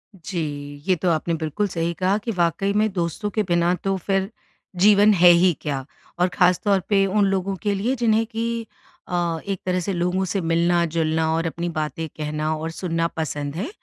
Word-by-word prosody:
जी, 145 Hz, -5 st, -5 dB
ये 185 Hz, -, +4 dB
तो 180 Hz, +1 st, -1 dB
आपने 165 Hz, +1 st, 0 dB
बिल्कुल 165 Hz, +6 st, -1 dB
सही 170 Hz, -2 st, -2 dB
कहा 190 Hz, +2 st, +2 dB
कि 230 Hz, -, -1 dB
वाक़ई 175 Hz, +2 st, 0 dB
में 215 Hz, +1 st, +2 dB
दोस्तों 175 Hz, +4 st, -2 dB
के 215 Hz, -, +2 dB
बिना 175 Hz, -1 st, +2 dB
तो 195 Hz, 0 st, 0 dB
फिर 195 Hz, +1 st, -1 dB, 0.5 s
जीवन 205 Hz, +3 st, +6 dB
है 175 Hz, -2 st, +7 dB
ही 175 Hz, +1 st, +5 dB
क्या। 135 Hz, -3 st, -3 dB, 0.3 s
और 180 Hz, -, +4 dB
ख़ासतौर 190 Hz, +2 st, +3 dB
पे 195 Hz, -2 st, +4 dB
उन 200 Hz, +1 st, +2 dB
लोगों 195 Hz, 0 st, 0 dB
के 205 Hz, -1 st, +1 dB
लिए, 230 Hz, +7 st, 0 dB
जिन्हें 225 Hz, -2 st, +2 dB
कि 230 Hz, +1 st, -3 dB, 0.4 s
अ, 175 Hz, -2 st, -1 dB
एक 195 Hz, -2 st, -2 dB
तरह 185 Hz, 0 st, +1 dB
से 195 Hz, -, -2 dB
लोगों 180 Hz, +2 st, 0 dB
से 200 Hz, -, 0 dB
मिलना-जुलना 165 Hz, -1 st, +1 dB
और 165 Hz, +1 st, 0 dB
अपनी 170 Hz, +2 st, -3 dB
बातें 160 Hz, 0 st, -3 dB
कहना 155 Hz, +1 st, -2 dB
और 160 Hz, +1 st, -4 dB
सुनना 165 Hz, -1 st, -1 dB
पसंद 145 Hz, -3 st, -4 dB
है, 205 Hz, -, -3 dB
175 Hz, 185 wpm, -23 LUFS, 165-195 Hz, 0.5 s, है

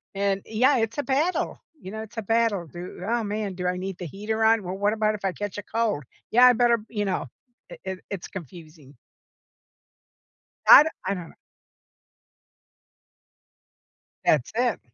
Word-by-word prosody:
and, 195 Hz, 0 st, 0 dB
yeah, 255 Hz, +5 st, +3 dB
it's 225 Hz, +1 st, -1 dB
a 290 Hz, -, 0 dB
battle, 295 Hz, +7 st, 0 dB, 0.2 s
you 185 Hz, -, -8 dB
know, 220 Hz, +1 st, -5 dB
it's 220 Hz, +1 st, -14 dB
a -, -, -1 dB
battle. 225 Hz, -4 st, +1 dB
Do 175 Hz, +5 st, -9 dB
"Oh, 235 Hz, 0 st, 0 dB
man, 205 Hz, -2 st, -3 dB
do 180 Hz, 0 st, -5 dB
I 180 Hz, 0 st, -1 dB
need 190 Hz, 0 st, -5 dB
the 180 Hz, -, -6 dB
heater 210 Hz, +6 st, -3 dB
on? 225 Hz, 0 st, +4 dB
Well, 185 Hz, +1 st, -5 dB
what 205 Hz, +1 st, +1 dB
about 215 Hz, -1 st, +1 dB
if 200 Hz, -, -7 dB
I 190 Hz, -, +1 dB
catch 205 Hz, +1 st, -5 dB
a 205 Hz, -, -5 dB
cold? 220 Hz, -9 st, -1 dB, 0.3 s
Yeah, 245 Hz, +2 st, +7 dB
I 250 Hz, -, +8 dB
better" 235 Hz, 0 st, +3 dB
you 210 Hz, -2 st, -2 dB
know, 185 Hz, -5 st, -1 dB, 0.4 s
it -, -, -11 dB
it 190 Hz, -1 st, -4 dB
it's 195 Hz, -3 st, -5 dB
confusing. 155 Hz, -4 st, -11 dB, 1.7 s
I -, -, +11 dB
du 315 Hz, -, -2 dB, 0.2 s
I -, -, +2 dB
dunno. 180 Hz, -4 st, -8 dB, 2.9 s
That's 140 Hz, -5 st, +2 dB
it. 245 Hz, -1 st, +1 dB
205 Hz, 170 wpm, -25 LUFS, 185-225 Hz, 2.9 s, I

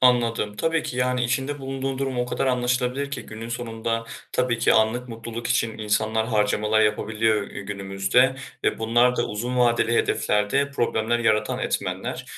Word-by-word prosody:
Anladım. 115 Hz, -4 st, +2 dB
Tabii 165 Hz, +4 st, +1 dB
ki, 125 Hz, -, -5 dB
yani, 125 Hz, 0 st, +1 dB
içinde 135 Hz, +4 st, -1 dB
bulunduğun 135 Hz, 0 st, -3 dB
durum 135 Hz, -2 st, -2 dB
o 125 Hz, -, 0 dB
kadar 135 Hz, -, -1 dB
anlaşılabilir 125 Hz, +2 st, 0 dB
ki 120 Hz, -4 st, -4 dB
günün 110 Hz, +1 st, -8 dB
sonunda 115 Hz, -1 st, -3 dB, 0.3 s
tabii 125 Hz, -2 st, +1 dB
ki 115 Hz, -, +4 dB
anlık 115 Hz, +3 st, +2 dB
mutluluk 115 Hz, 0 st, -6 dB
için 115 Hz, -3 st, 0 dB
insanlar 110 Hz, +1 st, 0 dB
harcamalar 105 Hz, -1 st, +2 dB
yapabiliyor, 105 Hz, 0 st, +1 dB
eee, -, -, -7 dB
günümüzde 100 Hz, +6 st, +1 dB, 0.3 s
ve -, -, +1 dB
bunlar 120 Hz, +3 st, +3 dB
da 120 Hz, -, +1 dB
uzun 120 Hz, +4 st, -3 dB
vadeli 120 Hz, -1 st, +3 dB
hedeflerde 105 Hz, +9 st, +1 dB
problemler 120 Hz, -3 st, 0 dB
yaratan 110 Hz, -2 st, +1 dB
etmenler. -, -, -3 dB
120 Hz, 155 wpm, -24 LUFS, 110-125 Hz, 0.3 s, ki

